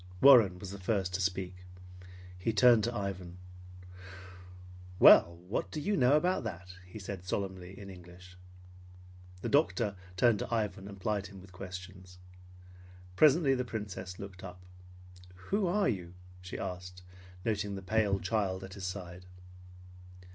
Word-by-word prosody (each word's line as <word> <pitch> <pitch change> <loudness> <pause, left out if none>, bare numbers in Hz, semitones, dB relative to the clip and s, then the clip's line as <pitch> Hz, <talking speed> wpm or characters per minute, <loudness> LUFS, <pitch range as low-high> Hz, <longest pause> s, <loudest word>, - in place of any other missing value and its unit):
Warren 115 -9 +7
was 95 +1 -8
the 100 - -8
first 95 -2 -1
to 95 - -1
speak. 90 0 -2 0.8
He 95 +5 -2
turned 115 0 +6
to 120 0 -3
Ivan. 95 -4 -5 1.6
"Well, 85 -1 +7
what 100 - -2
do 155 - -5
you 205 +7 0
know 135 0 +5
about 180 +1 0
that?" 90 -4 -7
he 90 - -10
said 95 -2 -7
solemnly 95 -1 -4
in 100 -1 -9
English. 90 0 -14 1.1
The - - -1
doctor 120 -8 +2 0.2
turned 115 -1 +4
to - - -5
Ivan 105 -4 -2
and 100 -1 -10
plied 100 0 -1
him 100 -1 -12
with 95 0 -15
questions. 95 0 -9 1.0
Presently 150 - +5
the 125 -1 0
Princess 100 -6 -6
looked 95 -2 -9
up. 90 -1 -10 0.7
"Who 190 - -1
are 200 +3 +2
you?" 90 -5 -3 0.3
she 90 - -7
asked, 90 -1 -6 0.4
noting 105 -3 -1
the 95 - -7
pale 105 -1 +1
child 95 -1 -1
at 95 0 -9
his 100 -2 -7
side. 90 -1 -7
95 Hz, 145 wpm, -31 LUFS, 90-110 Hz, 1.6 s, Warren